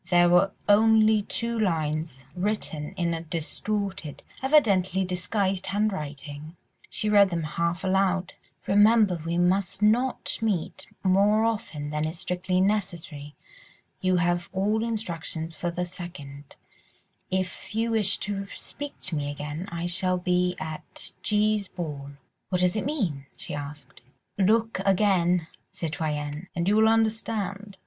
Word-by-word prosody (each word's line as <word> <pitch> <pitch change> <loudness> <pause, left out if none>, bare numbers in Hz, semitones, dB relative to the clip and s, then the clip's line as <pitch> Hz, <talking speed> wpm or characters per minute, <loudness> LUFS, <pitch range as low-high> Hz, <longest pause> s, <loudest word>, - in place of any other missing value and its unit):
There 175 -1 +5
were 180 +3 +5 0.2
only 215 +1 +5
two 235 +3 -2
lines, 155 -7 -1
written 180 -6 -2
in 170 -1 0
a 165 - -3
distorted, 180 +1 -3 0.2
evidently 195 - +3
disguised, 185 +1 -1
handwriting; 155 -6 -3 0.3
she 215 - -2
read 205 -2 +6
them 170 -2 -2
half 170 +3 -1
aloud— 190 -1 +1 0.3
"'Remember 205 -3 +5
we 170 +1 -1
must 185 +3 +1
not 240 +5 +2
meet 205 -7 -1 0.2
more 200 +3 +4
often 210 -10 -2
than 150 +1 0
is 160 +2 -5
strictly 180 +1 -1
necessary. 175 -7 -1 0.6
You 185 -1 +2
have 175 0 +1
all 210 +4 +1
instructions 170 -7 -3
for 175 +3 -3
the 175 +1 -2
2nd. 145 -6 -8 0.7
If 185 +3 -3
you 230 +1 +1
wish 215 -2 +2
to 200 -1 -3
speak 290 0 -7
to 175 - -1
me 145 -1 -2
again, 150 +5 -5
I 170 0 -3
shall 185 +1 +1
be 180 0 +1
at 155 -1 -6
G.'s 210 -1 +2
ball.'" 145 -6 -6 0.4
"What 180 -1 +1
does 180 +2 +3
it 215 - -1
mean?" 175 - -2
she - - -6
asked. 145 -2 -8 0.4
"Look 220 +2 +3
again, 180 -3 +3 0.3
citoyenne, 155 -1 -3
and 170 0 -1
you 205 - +4
will 220 0 +6
understand." 215 -3 -1
185 Hz, 135 wpm, -26 LUFS, 165-210 Hz, 0.7 s, read